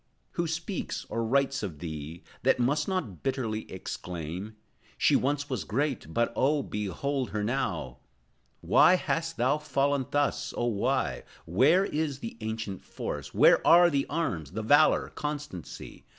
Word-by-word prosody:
Who 170 Hz, -1 st, -1 dB
speaks, 170 Hz, +4 st, -4 dB
or 115 Hz, -, -1 dB
writes 135 Hz, +3 st, +1 dB
of 95 Hz, -8 st, -5 dB
thee, 80 Hz, +1 st, -7 dB, 0.2 s
That -, -, +3 dB
must 145 Hz, +5 st, +1 dB
not 150 Hz, -, -3 dB
bitterly 115 Hz, -5 st, -2 dB
exclaim: 90 Hz, +2 st, -6 dB, 0.4 s
"She -, -, +4 dB
once 145 Hz, +2 st, 0 dB
was 130 Hz, -7 st, -3 dB
great, 130 Hz, -, -2 dB
but, 115 Hz, +5 st, 0 dB
oh, 145 Hz, +1 st, +2 dB
behold 125 Hz, +7 st, -2 dB
her 105 Hz, -1 st, -2 dB
now"? 105 Hz, -, -2 dB, 0.6 s
Why 185 Hz, -, +6 dB
hast 165 Hz, -2 st, -2 dB
thou 130 Hz, +5 st, +2 dB
fallen 140 Hz, -2 st, 0 dB
thus, 145 Hz, 0 st, 0 dB
oh, 120 Hz, -, 0 dB
why? 125 Hz, +5 st, 0 dB, 0.2 s
Where 135 Hz, -, +4 dB
is 150 Hz, -5 st, -2 dB
the 115 Hz, -, -7 dB
ancient 110 Hz, -3 st, -4 dB
force? -, -, -6 dB
Where -, -, +6 dB
are 175 Hz, +1 st, +7 dB
the 140 Hz, -1 st, 0 dB
arms, 90 Hz, -, -2 dB
the 110 Hz, +2 st, -3 dB
valor, 145 Hz, +7 st, +4 dB
constancy? 150 Hz, -, -6 dB
130 Hz, 145 wpm, -28 LUFS, 105-145 Hz, 0.6 s, are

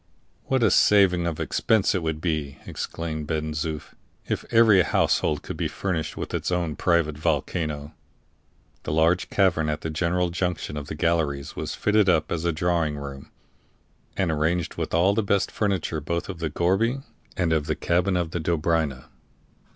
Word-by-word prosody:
"What 130 Hz, -2 st, +1 dB
a 110 Hz, -, +4 dB
saving 90 Hz, -4 st, +4 dB
of 80 Hz, -2 st, -3 dB
expense 110 Hz, -3 st, +2 dB
it 95 Hz, -, 0 dB
would 80 Hz, -1 st, -3 dB
be," 75 Hz, -5 st, -2 dB
exclaimed 80 Hz, -2 st, -5 dB
Ben 80 Hz, -1 st, -2 dB
Zoof, 75 Hz, 0 st, -4 dB, 0.3 s
"if -, -, -2 dB
every 110 Hz, -4 st, +6 dB
household 75 Hz, -3 st, +1 dB
could -, -, -6 dB
be -, -, 0 dB
furnished 85 Hz, -5 st, -3 dB
with -, -, -5 dB
its -, -, -2 dB
own 85 Hz, -4 st, -1 dB
private 85 Hz, -4 st, +1 dB
volcano!" 75 Hz, -1 st, -2 dB, 0.9 s
The 75 Hz, -, -4 dB
large 85 Hz, +4 st, +2 dB
cavern 90 Hz, -6 st, +2 dB
at 75 Hz, 0 st, -2 dB
the 80 Hz, -, -3 dB
general 85 Hz, +2 st, 0 dB
junction 90 Hz, -3 st, -2 dB
of 75 Hz, -1 st, -5 dB
the 75 Hz, -, -5 dB
galleries 80 Hz, -4 st, 0 dB
was -, -, -4 dB
fitted 105 Hz, -2 st, +3 dB
up 80 Hz, -3 st, +2 dB
as 85 Hz, 0 st, -2 dB
a 85 Hz, -, +2 dB
drawing 80 Hz, -2 st, 0 dB
room, 70 Hz, -1 st, -8 dB, 0.9 s
and 95 Hz, -4 st, +1 dB
arranged 80 Hz, +2 st, 0 dB
with -, -, -4 dB
all 90 Hz, +4 st, +4 dB
the 110 Hz, -, +1 dB
best 100 Hz, -2 st, +1 dB
furniture 95 Hz, -6 st, -1 dB
both 85 Hz, +5 st, -3 dB
of 90 Hz, -4 st, -6 dB
the 80 Hz, -2 st, -2 dB
gourbi 105 Hz, -, +1 dB, 0.3 s
and 85 Hz, -3 st, +1 dB
of 75 Hz, -1 st, 0 dB
the 80 Hz, -, 0 dB
cabin 90 Hz, +2 st, +1 dB
of 85 Hz, -2 st, -2 dB
the 85 Hz, -, -2 dB
Dobryna. 80 Hz, -4 st, 0 dB
85 Hz, 175 wpm, -25 LUFS, 75-90 Hz, 0.9 s, every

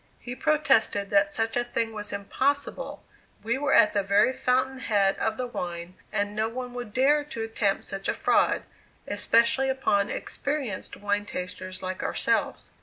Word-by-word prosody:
'" -, -, -35 dB
He 245 Hz, -, -6 dB
protested 230 Hz, -8 st, +2 dB
that 200 Hz, 0 st, +4 dB
such 225 Hz, +2 st, -2 dB
a 245 Hz, -, +2 dB
thing 230 Hz, -2 st, -2 dB
was 210 Hz, -1 st, -6 dB
impossible; 265 Hz, +8 st, -2 dB, 0.4 s
we 235 Hz, +4 st, 0 dB
were 285 Hz, -1 st, +2 dB
at 210 Hz, -, +6 dB
the 205 Hz, -, +2 dB
very 200 Hz, +5 st, +3 dB
fountain 260 Hz, +1 st, 0 dB
head 200 Hz, -5 st, +2 dB
of 220 Hz, 0 st, 0 dB
the 255 Hz, -, -2 dB
wine, 175 Hz, -6 st, -5 dB, 0.2 s
and 205 Hz, 0 st, -1 dB
no 220 Hz, +1 st, 0 dB
one 250 Hz, +1 st, -6 dB
would 245 Hz, -3 st, -6 dB
dare 280 Hz, +5 st, +3 dB
to 260 Hz, -7 st, -5 dB
attempt 220 Hz, -3 st, 0 dB
such 195 Hz, 0 st, -5 dB
a -, -, 0 dB
fraud, -, -, +2 dB, 0.4 s
especially 235 Hz, +5 st, +2 dB
upon 210 Hz, -6 st, +1 dB
experienced 280 Hz, -9 st, -3 dB
wine 205 Hz, 0 st, -1 dB
tasters 185 Hz, 0 st, -5 dB
like 185 Hz, 0 st, -4 dB
ourselves. -, -, 0 dB
220 Hz, 170 wpm, -27 LUFS, 200-255 Hz, 0.4 s, at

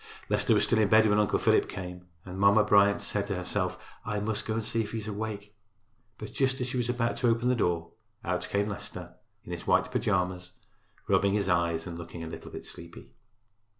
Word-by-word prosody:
Leicester -, -, +3 dB
was -, -, +3 dB
still 115 Hz, -, +2 dB
in 105 Hz, -, +4 dB
bed 110 Hz, +1 st, +6 dB
when 105 Hz, 0 st, +3 dB
Uncle 105 Hz, -2 st, +2 dB
Philip -, -, +3 dB
came, 90 Hz, -1 st, -7 dB, 0.2 s
and 95 Hz, 0 st, -7 dB
Mamma 100 Hz, +2 st, +6 dB
Bryant 100 Hz, 0 st, +4 dB
said 100 Hz, -1 st, -1 dB
to 100 Hz, -, -2 dB
herself, 90 Hz, +1 st, -2 dB, 0.3 s
"I 105 Hz, 0 st, -2 dB
must 105 Hz, +1 st, -2 dB
go 110 Hz, -, -1 dB
and 115 Hz, -1 st, -2 dB
see 115 Hz, +1 st, 0 dB
if 105 Hz, 0 st, -5 dB
he -, -, -2 dB
is 110 Hz, -1 st, -5 dB
awake." 105 Hz, -1 st, -5 dB, 0.6 s
But 110 Hz, -, -8 dB
just 135 Hz, 0 st, +1 dB
as 125 Hz, -, -1 dB
she 125 Hz, -, -3 dB
was 120 Hz, -1 st, -1 dB
about 120 Hz, -1 st, 0 dB
to 125 Hz, -, +1 dB
open 115 Hz, +1 st, +2 dB
the 125 Hz, -, +3 dB
door, 85 Hz, -6 st, 0 dB, 0.3 s
out -, -, -2 dB
came 100 Hz, +1 st, +1 dB
Leicester 105 Hz, -, -6 dB, 0.3 s
in -, -, -8 dB
his -, -, -6 dB
white 125 Hz, -, +3 dB
pajamas, 90 Hz, -6 st, -1 dB, 0.5 s
rubbing 100 Hz, 0 st, +3 dB
his 100 Hz, -2 st, 0 dB
eyes 85 Hz, -2 st, +1 dB
and 85 Hz, -1 st, -6 dB
looking 85 Hz, 0 st, -8 dB
a -, -, -5 dB
little -, -, -8 dB
bit -, -, -8 dB
sleepy. 85 Hz, 0 st, -10 dB
105 Hz, 215 wpm, -29 LUFS, 90-110 Hz, 0.6 s, bed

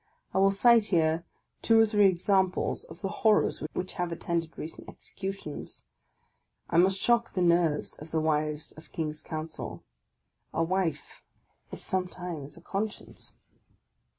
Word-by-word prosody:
I -, -, +2 dB
will 195 Hz, 0 st, +6 dB
cite 225 Hz, +3 st, +5 dB
here 165 Hz, -3 st, +2 dB, 0.4 s
two 225 Hz, -1 st, +5 dB
or 225 Hz, -, +7 dB
three 210 Hz, -2 st, +5 dB
examples 190 Hz, +1 st, +1 dB
of -, -, -13 dB
the 195 Hz, -, -1 dB
horrors 215 Hz, -2 st, +3 dB
which 185 Hz, -, -3 dB
have 175 Hz, -1 st, -2 dB
attended 165 Hz, 0 st, -2 dB
recent 160 Hz, -, -8 dB
executions. 195 Hz, -6 st, -7 dB, 0.9 s
I 165 Hz, -, +2 dB
must 190 Hz, +2 st, +4 dB
shock 235 Hz, -1 st, +2 dB
the 185 Hz, -, 0 dB
nerves 170 Hz, -3 st, +2 dB
of 155 Hz, -, -10 dB
the 160 Hz, -, 0 dB
wives 155 Hz, 0 st, 0 dB
of 155 Hz, -, -15 dB
king's 155 Hz, -2 st, -3 dB
counsel. 155 Hz, 0 st, -6 dB, 0.7 s
A 165 Hz, -, +2 dB
wife 165 Hz, -4 st, -2 dB, 0.5 s
is -, -, -7 dB
sometimes 180 Hz, -5 st, -3 dB
a -, -, -13 dB
conscience! 205 Hz, +4 st, -5 dB
175 Hz, 140 wpm, -29 LUFS, 160-195 Hz, 0.9 s, or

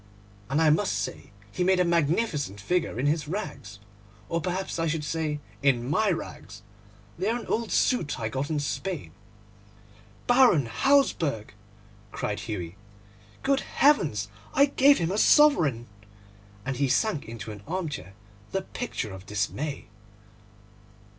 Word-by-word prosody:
And 140 Hz, +3 st, +1 dB
I 160 Hz, -2 st, +5 dB
must 150 Hz, -9 st, +2 dB
say 105 Hz, -, -5 dB, 0.2 s
he 180 Hz, -, -1 dB
made 185 Hz, 0 st, +3 dB
a 180 Hz, -, +4 dB
magnificent 160 Hz, -, 0 dB
figure 165 Hz, -, -1 dB
in 130 Hz, -, 0 dB
his 150 Hz, 0 st, +1 dB
rags, 145 Hz, -, -5 dB, 0.5 s
or 170 Hz, 0 st, -1 dB
perhaps 185 Hz, 0 st, -3 dB
I 165 Hz, -, +1 dB
should 155 Hz, -1 st, -1 dB
say 150 Hz, 0 st, -2 dB, 0.2 s
in 130 Hz, -4 st, +2 dB
my 205 Hz, +9 st, +2 dB
rags; 105 Hz, -, -5 dB, 0.6 s
they 195 Hz, +4 st, 0 dB
are 235 Hz, -, +1 dB
an -, -, -9 dB
old 230 Hz, -1 st, -1 dB
suit 165 Hz, -, +1 dB
I 110 Hz, -, -1 dB
got 135 Hz, +5 st, -3 dB
in 155 Hz, -2 st, 0 dB
Spain.' 170 Hz, +3 st, -4 dB, 1.1 s
'Baron 245 Hz, -, +5 dB
Hausberg!' 155 Hz, -, +1 dB, 0.6 s
cried 105 Hz, -, -3 dB
Hughie. 95 Hz, -5 st, -5 dB, 0.7 s
'Good 275 Hz, 0 st, +2 dB
heavens! 145 Hz, -, +2 dB, 0.3 s
I 280 Hz, -, +7 dB
gave 280 Hz, 0 st, +5 dB
him 165 Hz, +1 st, -1 dB
a 205 Hz, -, 0 dB
sovereign!' 165 Hz, -, +5 dB, 0.8 s
and 135 Hz, -1 st, -2 dB
he 140 Hz, +1 st, +2 dB
sank 210 Hz, -, +1 dB
into 115 Hz, -1 st, -7 dB
an 105 Hz, -1 st, -9 dB
armchair 155 Hz, -, -4 dB, 0.4 s
the 195 Hz, 0 st, -1 dB
picture 190 Hz, -, -5 dB
of 95 Hz, +1 st, -11 dB
dismay. 120 Hz, +8 st, -3 dB
155 Hz, 140 wpm, -27 LUFS, 120-190 Hz, 1.1 s, I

